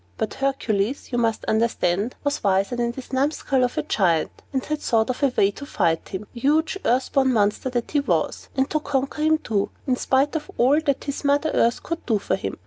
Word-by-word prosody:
But 220 - -2
Hercules, 260 -4 -1
you 240 - 0
must 225 -2 0
understand, 220 -1 0
was 285 0 -1
wiser 195 +3 +2
than 240 -1 0
this 260 +1 -10
numskull 270 -1 +1
of 245 - -1
a - - +1
Giant, 170 -6 +1 0.2
and 265 -2 -2
had 305 0 -3
thought 225 0 +2
of 250 - -7
a 280 - +5
way 195 - +4
to 280 - -9
fight 165 - 0
him 195 +2 -5
huge, 300 +8 +1
earth 255 +2 +1
born 265 -2 +3
monster 210 +2 +1
that 240 -2 -3
he 295 - +2
was 280 - -1
and 265 0 +2
to 310 - +1
conquer 275 0 -2
him 315 +1 +4
too, 210 -9 -1 0.2
in 255 - +2
spite 275 +5 +1
of 305 - -3
all 275 +6 +4
that 280 -4 0
his 280 +1 -4
Mother 285 +2 +2
Earth 235 0 +2
could 335 +1 -4
do 225 -3 +3
for 200 - -1
him. 95 - -5
255 Hz, 220 wpm, -23 LUFS, 220-285 Hz, 0.2 s, a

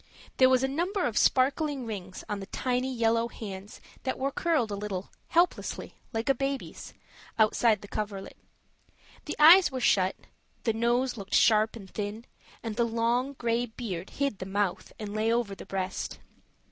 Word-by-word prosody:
There 260 -1 +6
was 260 0 +4
a - - +3
number 350 +8 -1
of 235 - -1
sparkling 275 +2 +2
rings 190 -4 -6
on 205 -1 -3
the 195 - -7
tiny 255 +2 -1
yellow 230 -1 +2
hands, 200 -3 -8 0.2
that 260 - -2
were 275 +1 -1
curled 300 -9 +1
a - - -1
little, 200 -2 -5 0.2
helplessly, 345 +2 0 0.2
like 225 -1 -3
a 275 - +5
baby's, 275 +1 -4 0.4
outside 220 0 +3
the - - -9
coverlet; 205 -2 -5 0.9
the - - -4
eyes 335 +3 +8
were 260 - -3
shut, 190 -6 +3 0.5
the 225 - +1
nose 240 +3 +1
looked 195 -2 -3
sharp 220 0 +4
and 200 -4 -10
thin, 210 +4 -5 0.4
and 225 -2 -4
the 240 - +3
long 235 +4 0
gray 240 -1 0
beard 205 -6 -6
hid 275 -7 -2
the 185 - -5
mouth 195 -1 -1
and 210 -2 -6
lay 215 +1 +1
over 235 -4 0
the - - -10
breast. 190 -1 -3
230 Hz, 170 wpm, -28 LUFS, 205-260 Hz, 0.9 s, eyes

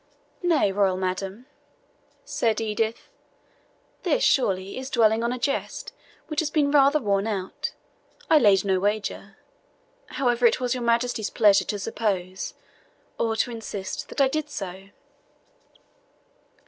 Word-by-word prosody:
"Nay, 330 - +2
royal 190 -2 +2
madam," 190 +4 -3 0.8
said 225 -2 0
Edith, 220 +1 -2 0.9
"this, - - +1
surely, 195 - +1
is 260 0 -6
dwelling 225 -3 +3
on 235 - 0
a 250 - -2
jest 275 +3 -3 0.3
which 305 -1 -3
has 320 - 0
rather 285 0 +4
been 250 - -11
worn 200 +1 +1
out, 195 -4 -3 0.5
I 315 - +6
laid 200 -6 +4
no 190 -1 +2
wager, 200 -1 -2 0.7
however 245 - +2
it 230 - +1
was 250 -1 0
your 250 - -4
Majesty's 235 -2 0
pleasure 205 -4 +4
to 210 - -2
suppose, 195 -3 -3 0.6
or 225 -1 +1
to 240 - 0
insist, 210 -4 -6
that - - -6
I 275 - +6
did 300 +2 -2
so." 195 -5 -7
225 Hz, 135 wpm, -25 LUFS, 195-255 Hz, 0.9 s, I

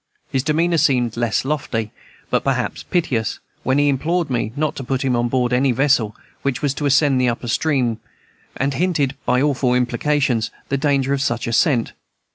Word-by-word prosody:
His 135 - +1
demeanor 165 +4 +1
seemed 125 -6 +2
less 120 +1 0
lofty, 120 -7 -2 0.4
but - - +2
rather - - 0 0.2
piteous, 130 - 0 0.2
when 130 +2 +1
he 145 0 +3
implored 155 +3 0
me 115 -3 -1
not 150 0 -1
to 135 - -4
put 135 +1 -2
him 130 -2 +2
on 120 0 +1
board 125 0 0
any 130 +1 +3
vessel 125 -4 +2 0.3
which 135 0 -2
was 140 -2 +1
to 145 +1 -2
ascend 140 -1 +3
the 125 - +3
upper 120 +1 -4
stream, 125 -3 0 0.6
and 140 +1 0
hinted, 150 -5 0
by 125 +2 +3
awful 135 -4 +1
implications, 125 -1 +1 0.2
the 140 - +1
danger 140 -1 +1
of 140 - -1
such 120 -4 -1
ascent. 120 +1 +1
135 Hz, 180 wpm, -20 LUFS, 120-145 Hz, 0.6 s, he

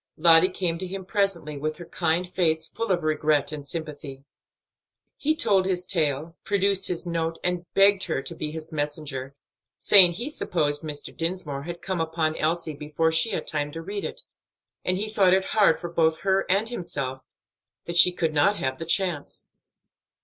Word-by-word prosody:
Lottie 165 +2 +6
came 175 -3 -2
to 185 - -3
him 190 0 -7
presently, 185 -8 -1
with 155 +2 -3
her 175 - -9
kind 170 +1 -1
face 160 -3 0
full 230 +3 -4
of 175 -3 0
regret 155 -2 +1
and 145 -2 -7
sympathy. 145 -3 -7 0.9
He 310 +2 0
told 195 -10 +2
his 180 -1 -1
tale, 160 -2 -1
produced 195 -1 +1
his 180 -1 -3
note, 165 -1 -2
and 180 -1 -2
begged 195 -1 +5
her 160 -6 -2
to 170 - -4
be 155 -2 -5
his 160 0 -7
messenger, 145 -3 -4 0.4
saying 185 -4 +7
he 240 - -4
supposed 150 - -1
Mr. 150 -2 -6
Dinsmore 165 -5 -3
had 170 0 -7
come 185 -3 -2
upon 160 -1 -1
Elsie 160 0 -1
before 150 +2 -1
she 160 +7 +3
had 200 - -3
time 145 -1 -1
to 165 - -6
read 200 +3 -5
it, - - -6 0.6
and 185 0 0
he 210 +3 -2
thought 195 -4 +3
it 190 0 0
hard 205 -7 +3
for 175 - -7
both 160 -1 +2
her 195 0 +1
and 200 +4 +2
himself 135 - -4 0.6
that 170 - -5
she 175 +1 +7
should 160 -2 0
not 195 +8 +3
have 130 -7 -2
the 165 - -5
chance. 170 -3 -1
170 Hz, 180 wpm, -25 LUFS, 155-190 Hz, 0.9 s, saying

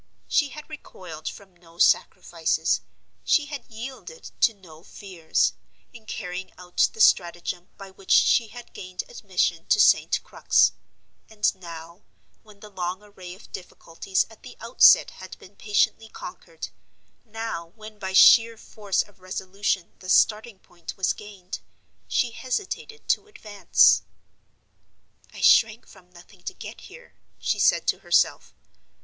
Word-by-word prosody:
She 290 -3 +2
had 300 +2 -10
recoiled 185 - -9
from 190 -3 -14
no 170 -1 -21
sacrifices, - - +1 0.4
she 300 - +3
had 290 -2 -8
yielded 260 - -9
to 235 - +5
no 165 -5 -16
fears, 180 -4 -2 0.4
in 225 -2 -15
carrying 180 +1 -6
out 180 0 +1
the - - -14
stratagem 175 -2 +2
by 195 -1 -11
which 190 0 -17
she 230 - +5
had 245 +2 -12
gained 185 0 -6
admission 180 -4 -2
to - - +3
St. - - +4
Crux; - - +3 0.6
and 215 -1 +1
now, 170 -1 -11 0.4
when 210 -2 -19
the 210 - -12
long 185 +1 -4
array 185 -3 -11
of 195 - -18
difficulties 185 +1 -3
at 225 -1 -18
the - - -12
outset 230 +2 +5
had 185 0 -11
been 195 - -17
patiently 220 +1 0
conquered, 485 - -9 0.5
now, 225 -6 -6
when 215 -1 -12
by 190 -1 -4
sheer 230 +3 +7
force 205 -3 -2
of 205 -2 -23
resolution 185 0 -3
the 185 - -10
starting 215 +2 +3
point 175 -2 -11
was 190 - +1
gained, 200 -3 -9 0.5
she 245 - 0
hesitated 390 - -5
to - - +1
advance. 210 - +3 1.3
"I - - -10
shrank 225 0 +4
from 180 -1 -18
nothing 180 +2 -18
to - - -5
get - - -10
here," 485 0 -15 0.2
she - - -1
said - - +3
to - - 0
herself. - - +1
200 Hz, 140 wpm, -25 LUFS, 180-225 Hz, 1.3 s, sheer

